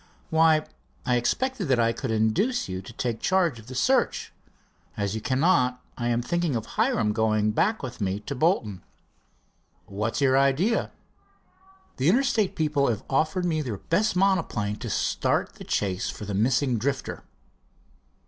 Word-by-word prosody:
"Why, 160 -1 +4 0.4
I 125 - +2
expected 225 - 0
that 130 -3 +2
I 115 0 +3
could - - -5
induce 110 - +1
you 95 0 -4
to 100 - -11
take 115 -1 -3
charge 175 -8 +1
of 110 - -15
the 130 - -8
search. 255 - +1 0.6
As 100 -1 -1
you 110 - -3
cannot, 130 - +2 0.2
I 120 - -3
am 120 0 +1
thinking 175 0 0
of 110 -2 -2
Hiram 105 -2 +1
going 110 -1 +1
back 215 - +1
with 125 -3 -6
me 95 0 -1
to 140 - -5
Bolton." 125 - 0 1.0
"What's 105 +6 -3
your 135 -1 +4
idea?" 140 - +2 1.1
"The 135 +5 +2
Interstate 225 -3 +2
people 150 -3 +1
have 110 -4 -1
offered 155 +6 +1
me 160 -3 0
their 120 -8 -4
best 200 - 0
monoplane 180 - +1
to - - -6
start - - 0
the - - -11
chase 95 -2 -1
for 105 - -7
the 100 - -4
missing 125 +4 +1
Drifter." 135 +2 -3
130 Hz, 160 wpm, -26 LUFS, 110-165 Hz, 1.1 s, Why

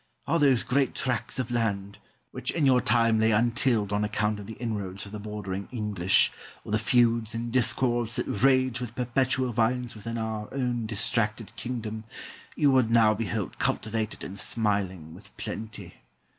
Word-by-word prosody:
All 165 - +1
those 135 -5 +4
great 135 +1 +1
tracts 125 -3 -1
of 125 -2 -2
land, 100 -4 -1 0.3
which - - -3
in 160 -4 +1
your 130 -2 +5
time 115 0 +3
lay 110 0 +4
untilled 115 -1 +2
on 105 +1 +1
account 105 0 0
of 100 - -9
the 110 - -7
inroads 100 -4 -4
of 100 - -10
the 105 - -6
bordering 100 -2 -5
English, 105 -6 +2 0.3
or - - -7
the 110 - +2
feuds 115 -1 +2
and 115 +1 -3
discords 120 -2 +2
that - - -1
raged 130 +2 +2
with 120 -1 -6
perpetual 125 +1 0
violence 120 +2 0
within 115 +2 -6
our 110 -2 -4
own 120 -4 -1
distracted 110 0 -1
kingdom, 110 -3 -5 0.5
you 145 -2 +4
would 130 -4 +3
now 115 -2 +5
behold 110 -2 -3
cultivated 110 0 -1
and 100 +2 -6
smiling 95 -7 -1
with 100 +4 -14
plenty. 110 -1 -6
115 Hz, 165 wpm, -27 LUFS, 105-120 Hz, 0.5 s, your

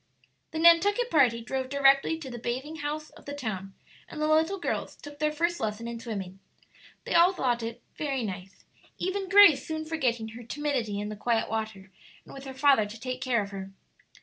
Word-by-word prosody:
The 320 - -6
Nantucket 365 +8 +5
party 250 -7 +4
drove 260 +2 -3
directly 275 +3 +4
to 285 -5 -8
the 240 - -7
bathing 260 +7 -4
house 305 +1 -4
of - - -17
the 285 - -6
town, 195 -8 -5 0.3
and 305 - -8
the 305 - +1
little 320 +5 +2
girls 355 - -3
took 290 0 -12
their 305 0 +1
first 340 +3 -1
lesson 220 +1 -3
in 235 0 -5
swimming. 195 -5 -6 0.6
They - - -4
all 345 +2 +6
thought 245 -8 0
it 230 0 -6
"very 275 -4 -2
nice," 190 -1 -7 0.3
even 380 +1 -2
Grace 390 -9 +7
soon 315 0 -4
forgetting 245 -8 -1
her 230 +2 -10
timidity 240 -5 -2
in 210 0 -4
the 215 - -5
quiet 225 +1 0
water 215 -4 -4 0.3
and - - -13
with 275 0 -9
her 265 -1 -7
father 265 -6 +4
to 215 +2 -10
take 255 +1 -5
care 240 -5 +1
of 200 - -9
her. 195 -1 -7
265 Hz, 200 wpm, -28 LUFS, 225-310 Hz, 0.6 s, Grace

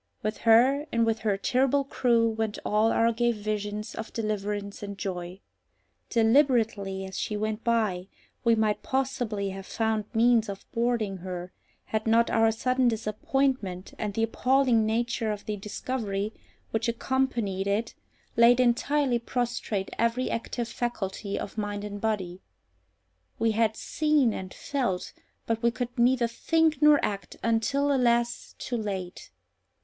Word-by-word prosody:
With 215 +1 -2
her 265 +6 +5
and 230 0 +2
with 225 0 0
her 210 -3 0
terrible 265 +6 +2
crew 235 -4 +2
went 220 -1 -2
all 215 +2 +3
our 230 0 +3
gay 240 +1 +2
visions 210 -1 -3
of 225 - -6
deliverance 205 -2 -3
and 200 -1 -6
joy. 180 0 -5 0.7
Deliberately 225 -6 +2
as 190 0 -6
she 210 - -2
went 215 +1 -2
by, 215 -6 0 0.4
we 230 -1 +4
might 215 -1 +1
possibly 250 -7 -1
have 195 0 -8
found 220 -2 -1
means 230 -1 +3
of 195 -1 -7
boarding 230 -4 0
her, 180 0 -6 0.3
had 220 0 -2
not 230 +1 +4
our 225 0 +4
sudden 255 +3 +1
disappointment 220 -3 -1
and 210 -2 -3
the 225 - +1
appalling 250 -1 +2
nature 225 0 0
of 205 -1 -6
the 210 - -2
discovery 210 0 -3 0.4
which 225 +1 0
accompanied 235 -6 -1
it 210 +3 0 0.4
laid 235 +1 +6
entirely 255 +1 +2
prostrate 235 -5 -2
every 235 +2 +1
active 235 +1 -3
faculty 210 -4 -3
of 210 - -5
mind 205 -1 -3
and 205 -1 -6
body. 190 -5 -2 1.0
We 225 0 +2
had 220 0 +1
seen 300 -7 +2
and 185 -1 -6
felt, 240 -11 -2 0.3
but 225 -1 -1
we 235 - +4
could 245 0 -4
neither 245 0 +3
think 315 +5 +1
nor 300 -1 +7
act, 200 -1 -5
until, 250 +6 +1
alas! 240 -2 +1
too 245 - -3
late. 195 -4 -5
225 Hz, 145 wpm, -27 LUFS, 205-245 Hz, 1.0 s, nor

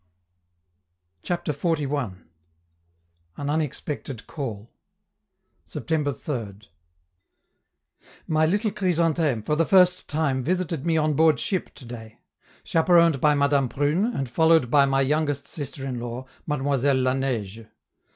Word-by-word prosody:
CHAPTER 175 - -2
XLI. 150 0 -1 1.5
AN 145 - -3
UNEXPECTED 145 -4 -4
CALL 115 -8 -6 0.9
September 150 -3 -2
3d. 110 -8 -6 1.6
My 155 0 +2
little 205 +5 +1
Chrysantheme 165 - +1
for 150 - +1
the 165 - +3
first 180 +1 +4
time 145 -4 0
visited 170 -1 -1
me 165 -1 +2
on 155 -1 +2
board 155 0 +4
ship 185 -4 -2
to 145 -3 -13
day, 115 -2 -10 0.5
chaperoned 165 -3 +3
by 150 -1 +4
Madame 140 -2 +2
Prune, 145 - +1
and 185 - -2
followed 160 0 +3
by 145 -2 +6
my 135 0 +1
youngest 145 0 0
sister 140 -2 -6
in 125 -3 -3
law, 120 +2 -6 0.2
Mademoiselle 140 -2 +1
La 130 0 +2
Neige. 115 -5 -3
145 Hz, 120 wpm, -24 LUFS, 130-160 Hz, 1.6 s, by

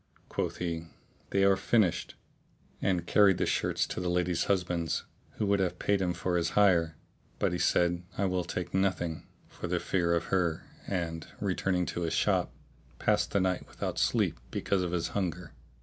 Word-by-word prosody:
Quoth - - -2
he, 85 -2 -3 0.4
"They 100 0 +2
are 100 0 +6
finished," 100 -2 +1 0.7
and 90 -3 +1
carried 100 -2 +5
the - - +1
shirts - - +1
to - - -5
the 90 -1 -1
lady's 90 -1 +1
husband, 90 -4 0 0.3
who 105 - -2
would 100 0 +2
have 95 -2 0
paid 100 -1 +1
him 90 -2 0
his 90 -1 0
hire: 85 -6 +3 0.4
but - - +1
he - - -2
said, 85 0 +2 0.2
"I 100 - +1
will 90 -1 0
take 90 +1 -4
nothing," 95 -4 0 0.2
for - - -7
fear 85 -2 +1
of 85 - 0
her 85 -4 +1 0.2
and, 85 -4 -3
returning 95 -2 0
to 85 - -4
his 85 -2 -1
shop, - - +2 0.5
passed - - +2
the 100 - +1
night 95 -1 0
without - - -4
sleep - - +1
because 100 -2 0
of 90 -1 -2
his 85 -2 -1
hunger. 90 -4 -3
90 Hz, 170 wpm, -30 LUFS, 85-95 Hz, 0.7 s, are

